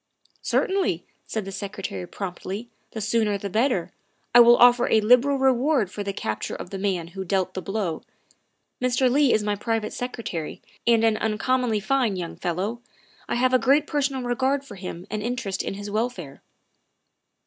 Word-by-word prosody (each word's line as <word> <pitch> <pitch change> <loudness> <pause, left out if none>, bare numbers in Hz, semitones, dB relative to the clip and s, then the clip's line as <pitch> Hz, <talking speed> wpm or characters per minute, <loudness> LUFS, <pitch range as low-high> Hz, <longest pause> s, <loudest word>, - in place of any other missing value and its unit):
" - - -42
Certainly," 375 - 0 0.2
said 220 -3 -3
the 195 - -6
Secretary 190 - -5
promptly, 195 +3 -6
" - - -43
the 220 - -4
sooner 215 -1 +1
the 200 0 -6
better. 215 -6 +1 0.4
I 240 - +9
will 240 0 +8
offer 245 0 +6
a 220 - +5
liberal 250 +6 +4
reward 265 - +2
for 205 - -5
the 200 - -2
capture 110 - -4
of - - -8
the 195 - -4
man 185 -4 -1
who 190 +2 -6
dealt 185 0 0
the 185 - -4
blow. 190 -3 -2 0.8
Mr. 255 +1 +2
Leigh 280 -1 +4
is 215 - +2
my 210 0 0
private 225 +1 -2
secretary 230 -10 -5 0.3
and 230 -1 +5
an 225 -1 +3
uncommonly 220 +1 0
fine 245 -2 +1
young 175 -2 -5
fellow. 190 +7 -3 0.5
I - - 0
have 255 +1 +2
a 255 - +5
great 285 +4 +3
personal 275 -3 -1
regard 265 +3 0
for 275 - -10
him 180 -2 -7
and 215 0 -2
interest 235 -4 -2
in - - -4
his 205 +1 -7
welfare." 210 - -3
220 Hz, 180 wpm, -24 LUFS, 195-250 Hz, 0.8 s, I